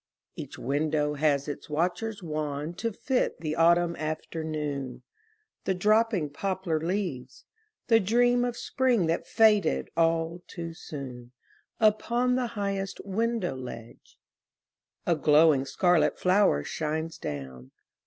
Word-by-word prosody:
Each -, -, -8 dB
window 150 Hz, +2 st, 0 dB
has 145 Hz, -1 st, +1 dB
its 145 Hz, -, -6 dB
watcher 175 Hz, +8 st, 0 dB
wan 150 Hz, -1 st, -3 dB
To 230 Hz, +6 st, -3 dB
fit 250 Hz, +4 st, -1 dB
the 155 Hz, -1 st, -3 dB
autumn 170 Hz, +1 st, +4 dB
afternoon, 150 Hz, -5 st, -4 dB, 0.6 s
The 190 Hz, -, +1 dB
dropping 210 Hz, -4 st, +2 dB
poplar 185 Hz, 0 st, -2 dB
leaves, 165 Hz, -7 st, -3 dB, 0.4 s
the 225 Hz, -1 st, +5 dB
dream 245 Hz, +4 st, +3 dB
Of 245 Hz, -1 st, -2 dB
spring 255 Hz, -8 st, +1 dB
that 165 Hz, +1 st, -1 dB
faded 210 Hz, -, +3 dB
all 165 Hz, +1 st, +1 dB
too 170 Hz, -1 st, -6 dB
soon. 130 Hz, -6 st, -8 dB, 0.5 s
Upon 235 Hz, +3 st, +2 dB
the 250 Hz, -1 st, 0 dB
highest 195 Hz, -1 st, -2 dB
window 215 Hz, -, -1 dB
ledge 120 Hz, -3 st, -10 dB, 0.9 s
A 170 Hz, -, +3 dB
glowing 150 Hz, -1 st, +4 dB
scarlet 165 Hz, -1 st, +2 dB
flower 180 Hz, -, +3 dB
shines 160 Hz, -, -3 dB
down. 65 Hz, -, -6 dB
165 Hz, 115 wpm, -28 LUFS, 150-200 Hz, 0.9 s, the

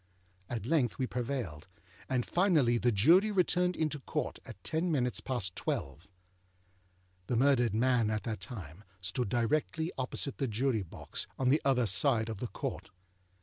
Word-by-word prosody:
At 115 Hz, -4 st, -4 dB
length 135 Hz, -4 st, +1 dB
we 130 Hz, -, 0 dB
prevailed, 120 Hz, -, -4 dB, 0.4 s
and 125 Hz, -2 st, 0 dB
finally 155 Hz, -11 st, +3 dB
the 120 Hz, -, +2 dB
Jury 165 Hz, -, +5 dB
returned 180 Hz, -2 st, +2 dB
into 155 Hz, -2 st, -1 dB
Court -, -, -3 dB
at 90 Hz, -, -11 dB
ten 165 Hz, +2 st, 0 dB
minutes 125 Hz, -5 st, +1 dB
past 115 Hz, -9 st, -2 dB
twelve. 70 Hz, +6 st, -3 dB, 1.2 s
The 120 Hz, -, 0 dB
murdered 120 Hz, -3 st, +3 dB
man 120 Hz, -1 st, +3 dB
at 110 Hz, -1 st, -1 dB
that 110 Hz, -4 st, -3 dB
time 95 Hz, -, -8 dB, 0.2 s
stood 95 Hz, +5 st, -2 dB
directly 155 Hz, -, 0 dB
opposite 130 Hz, +1 st, -3 dB
the 135 Hz, -, 0 dB
Jury 115 Hz, 0 st, 0 dB
box, 85 Hz, -, -4 dB
on 130 Hz, -1 st, +1 dB
the 145 Hz, +4 st, +4 dB
other 130 Hz, -3 st, +3 dB
side 115 Hz, +2 st, +3 dB
of 110 Hz, -3 st, -5 dB
the 125 Hz, -, -3 dB
Court. -, -, -5 dB
125 Hz, 155 wpm, -32 LUFS, 110-140 Hz, 1.2 s, Jury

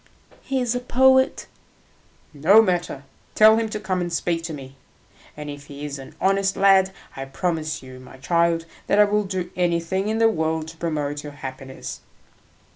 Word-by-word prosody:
"He 270 Hz, -1 st, -2 dB
is 245 Hz, -2 st, 0 dB
a 245 Hz, -, -1 dB
poet." 260 Hz, +1 st, +3 dB, 0.9 s
"No 165 Hz, +9 st, +6 dB
matter; 175 Hz, -9 st, 0 dB, 0.3 s
tell 220 Hz, +1 st, +7 dB
him 225 Hz, -1 st, -1 dB
to 215 Hz, -, -4 dB
come 185 Hz, -2 st, -2 dB
and 175 Hz, -1 st, -3 dB
speak 165 Hz, +1 st, -1 dB
to 170 Hz, -, -5 dB
me, 135 Hz, -3 st, -9 dB, 0.6 s
and 150 Hz, 0 st, -7 dB
if 145 Hz, 0 st, -8 dB
he 145 Hz, +1 st, -8 dB
is 140 Hz, -1 st, -5 dB
an 135 Hz, -, -11 dB
honest 195 Hz, 0 st, +1 dB
lad, 190 Hz, -1 st, +5 dB, 0.2 s
I 135 Hz, -, -5 dB
promise 155 Hz, +1 st, -3 dB
you, 130 Hz, 0 st, -11 dB
my 130 Hz, +1 st, -13 dB
child, 170 Hz, +3 st, +1 dB, 0.2 s
that 200 Hz, -, +2 dB
I 210 Hz, -, +8 dB
will 210 Hz, 0 st, +1 dB
do 185 Hz, -2 st, -4 dB
anything 180 Hz, +2 st, 0 dB
in 220 Hz, +1 st, 0 dB
the 225 Hz, 0 st, +5 dB
world 160 Hz, -5 st, -1 dB
to 165 Hz, -, -13 dB
promote 150 Hz, -3 st, -2 dB
your 145 Hz, -1 st, -8 dB
happiness." 130 Hz, -1 st, -8 dB
170 Hz, 180 wpm, -23 LUFS, 145-200 Hz, 0.9 s, I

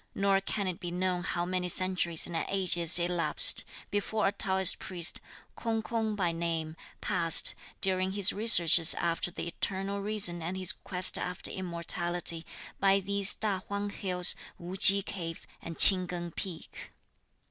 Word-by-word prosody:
Nor 195 Hz, 0 st, 0 dB
can 200 Hz, +1 st, -5 dB
it 180 Hz, -2 st, -5 dB
be 175 Hz, -, -7 dB
known 180 Hz, 0 st, -3 dB
how 175 Hz, 0 st, -4 dB
many 180 Hz, 0 st, -4 dB
centuries 180 Hz, -2 st, +2 dB
and 175 Hz, -, -8 dB
ages 175 Hz, -4 st, +2 dB
elapsed, 175 Hz, -1 st, +1 dB, 0.3 s
before 210 Hz, +1 st, -3 dB
a 195 Hz, -, 0 dB
Taoist 190 Hz, -2 st, +2 dB
priest, 175 Hz, -2 st, -5 dB, 0.3 s
K'ung 225 Hz, -1 st, -4 dB
K'ung 220 Hz, -2 st, -4 dB
by 180 Hz, -4 st, -2 dB
name, 165 Hz, -1 st, -5 dB, 0.3 s
passed, 170 Hz, -5 st, +3 dB, 0.3 s
during 190 Hz, 0 st, +1 dB
his 200 Hz, -1 st, +4 dB
researches 175 Hz, -6 st, +5 dB
after 170 Hz, 0 st, -4 dB
the 175 Hz, -, -8 dB
eternal 195 Hz, +3 st, -5 dB
reason 200 Hz, -5 st, 0 dB
and 175 Hz, +4 st, -6 dB
his 185 Hz, -1 st, +2 dB
quest 180 Hz, -1 st, +3 dB
after 180 Hz, 0 st, -3 dB
immortality, 175 Hz, -1 st, -2 dB, 0.3 s
by 195 Hz, 0 st, +2 dB
these 200 Hz, +1 st, 0 dB
Ta 205 Hz, -3 st, -3 dB
Huang 200 Hz, 0 st, -5 dB
Hills, 180 Hz, -3 st, +1 dB, 0.2 s
Wu 175 Hz, +2 st, -10 dB
Ch'i 195 Hz, +1 st, +6 dB
cave 165 Hz, -4 st, -8 dB, 0.2 s
and 165 Hz, -1 st, -10 dB
Ch'ing 185 Hz, -2 st, +6 dB
Keng 175 Hz, -1 st, -7 dB
Peak. 170 Hz, -1 st, -10 dB
185 Hz, 150 wpm, -28 LUFS, 175-195 Hz, 0.3 s, Ch'i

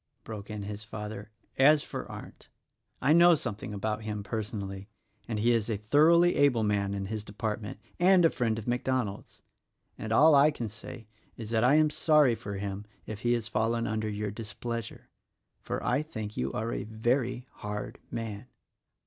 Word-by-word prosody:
broke 105 Hz, -2 st, -8 dB
in 105 Hz, -1 st, -5 dB
his 105 Hz, +1 st, -6 dB
father, 105 Hz, -1 st, -7 dB, 0.3 s
"as 145 Hz, +2 st, +6 dB
for -, -, -6 dB
Arndt! -, -, -11 dB, 0.5 s
I 145 Hz, +4 st, +5 dB
know 170 Hz, +1 st, +7 dB
something 105 Hz, -7 st, -5 dB
about 105 Hz, +2 st, -2 dB
him, 105 Hz, -1 st, -4 dB
personally, 100 Hz, -1 st, -5 dB, 0.4 s
and 110 Hz, -, -2 dB
he 120 Hz, +3 st, +3 dB
is 115 Hz, -1 st, 0 dB
a 110 Hz, -, 0 dB
thoroughly 160 Hz, -, +4 dB
able 130 Hz, -6 st, +4 dB
man 100 Hz, -1 st, 0 dB
in 100 Hz, 0 st, -3 dB
his 110 Hz, +1 st, -4 dB
department 105 Hz, 0 st, -4 dB
— -, -, -33 dB
and 185 Hz, -3 st, +6 dB
a 165 Hz, -, +5 dB
friend 115 Hz, -3 st, 0 dB
of 110 Hz, -, -6 dB
MacDonald's; 125 Hz, -4 st, -2 dB, 0.6 s
and 110 Hz, -, -5 dB
all 150 Hz, +7 st, +6 dB
I 140 Hz, +1 st, +7 dB
can 120 Hz, -7 st, -4 dB
say 105 Hz, +1 st, -10 dB, 0.3 s
is 115 Hz, -1 st, -7 dB
that 110 Hz, -1 st, +2 dB
I 130 Hz, +4 st, +5 dB
am 155 Hz, -1 st, +4 dB
sorry 150 Hz, -5 st, +4 dB
for 100 Hz, -2 st, -6 dB
him 100 Hz, 0 st, -4 dB, 0.2 s
if 110 Hz, -2 st, -6 dB
he 120 Hz, +1 st, +1 dB
has 115 Hz, -2 st, -1 dB
fallen 115 Hz, +2 st, 0 dB
under 110 Hz, 0 st, -1 dB
your 105 Hz, 0 st, -3 dB
displeasure; 115 Hz, +1 st, -6 dB, 0.5 s
for -, -, -4 dB
I -, -, +2 dB
think 110 Hz, -9 st, -6 dB
you 65 Hz, +2 st, -1 dB
are 115 Hz, +2 st, -2 dB
a -, -, -3 dB
very 120 Hz, +3 st, -1 dB
hard 105 Hz, 0 st, -5 dB
man." 110 Hz, 0 st, -5 dB
110 Hz, 180 wpm, -29 LUFS, 105-125 Hz, 0.6 s, know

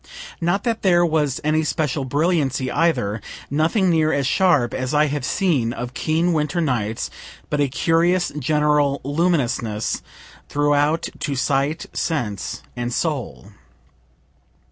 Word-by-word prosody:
Not 175 Hz, +4 st, +1 dB
that 230 Hz, -2 st, -1 dB
there 175 Hz, -3 st, +4 dB
was 150 Hz, -5 st, 0 dB
any 155 Hz, +1 st, +2 dB
special 150 Hz, -3 st, -1 dB
brilliancy 140 Hz, -3 st, 0 dB
either 115 Hz, -11 st, +1 dB, 0.3 s
nothing 165 Hz, +6 st, +2 dB
near 160 Hz, -1 st, +3 dB
as 140 Hz, -3 st, 0 dB
sharp 140 Hz, -5 st, +3 dB
as 130 Hz, +3 st, -2 dB
I 150 Hz, +1 st, +5 dB
have 145 Hz, -2 st, -2 dB
seen 130 Hz, -6 st, +1 dB
of 120 Hz, +1 st, -6 dB
keen 165 Hz, +5 st, +1 dB
winter 150 Hz, +1 st, 0 dB
nights, 115 Hz, -9 st, -1 dB, 0.4 s
but 145 Hz, -, +1 dB
a 145 Hz, -, +3 dB
curious 170 Hz, +5 st, +2 dB
general 150 Hz, 0 st, +2 dB
luminousness 140 Hz, -, 0 dB, 0.5 s
throughout 145 Hz, +2 st, +2 dB
to 140 Hz, -, -2 dB
sight, 140 Hz, +5 st, 0 dB
sense, 115 Hz, -, -3 dB
and 120 Hz, 0 st, -3 dB
soul. 130 Hz, -, -3 dB
150 Hz, 125 wpm, -21 LUFS, 130-165 Hz, 0.5 s, I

